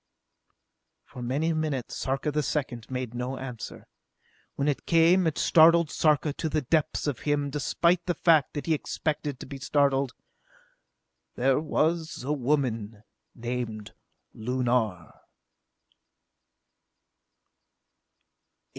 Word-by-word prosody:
For 125 - -10
many 145 +7 0
minutes 150 -6 -2
Sarka 135 +3 -1
the 150 +1 0
Second 130 -6 -3
made 125 -2 -4
no 125 +2 -3
answer. 125 -4 -7 0.7
When 140 - -1
it 145 -1 -1
came 170 +2 +5
it 155 - -1
startled 165 -1 +5
Sarka 150 -1 +2
to 160 - -3
the 155 -1 -1
depths 155 +3 0
of 145 -5 -2
him, 145 -1 -1
despite 170 +5 +1
the 175 - 0
fact 160 -2 +3
that 145 - -4
he 165 - -1
had 155 - +1
expected 150 -3 -3
to - - -8
be 135 +1 -8
startled. 140 -2 +1 1.2
"There 130 +2 +2
was 160 0 -1
a 145 +3 -1
woman 120 -7 -1 0.3
named 120 -3 -5 0.4
Lunar!" 120 -7 -1
140 Hz, 115 wpm, -27 LUFS, 125-155 Hz, 1.2 s, came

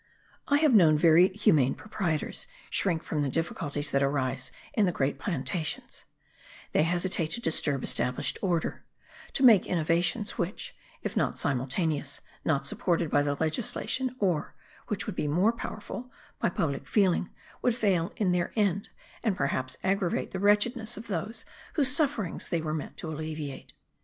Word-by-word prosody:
I 285 - +4
have 300 -3 +4
known 165 -8 +6
very 165 +3 +6
humane 160 -9 +2
proprietors 180 -7 -1 0.2
shrink 170 -5 0
from 150 - -2
the 140 - 0
difficulties 145 -1 -2
that 140 - +2
arise 130 -2 0 0.2
in 210 -4 +3
the - - +2
great 140 -3 -1
plantations; 155 -1 -3 0.7
they - - +3
hesitate 175 0 +1
to - - -3
disturb 145 - +1
established 125 0 +2
order, 175 -4 -1 0.5
to 270 - +1
make 225 -7 +7
innovations, 175 +6 0
which, 180 +4 -4 0.3
if - - -3
not - - 0
simultaneous, 140 +3 0 0.2
not 140 -3 +1
supported 165 +2 0
by 145 - +4
the 145 0 0
legislation, 245 - -1
or 180 -9 0 0.3
(which 210 - -2
would 210 - -4
be 150 - -1
more 180 +10 +3
powerful) 235 +2 -7 0.3
by - - +2
public 145 -5 -2
feeling, 190 -4 +2 0.3
would 245 -2 +2
fail 190 -7 +1
in 195 -4 +1
their 175 -1 0
end, 200 -3 +1 0.3
and 215 -5 0
perhaps 130 -2 -1
aggravate 190 -2 0
the 190 - -4
wretchedness 215 +3 +2
of 220 - -8
those 210 +5 -3 0.3
whose 270 -4 +4
sufferings 265 - -1
they 170 - 0
were 155 -1 -3
meant 155 -2 -5
to - - -6
alleviate. 155 -2 -6
170 Hz, 155 wpm, -28 LUFS, 150-205 Hz, 0.7 s, make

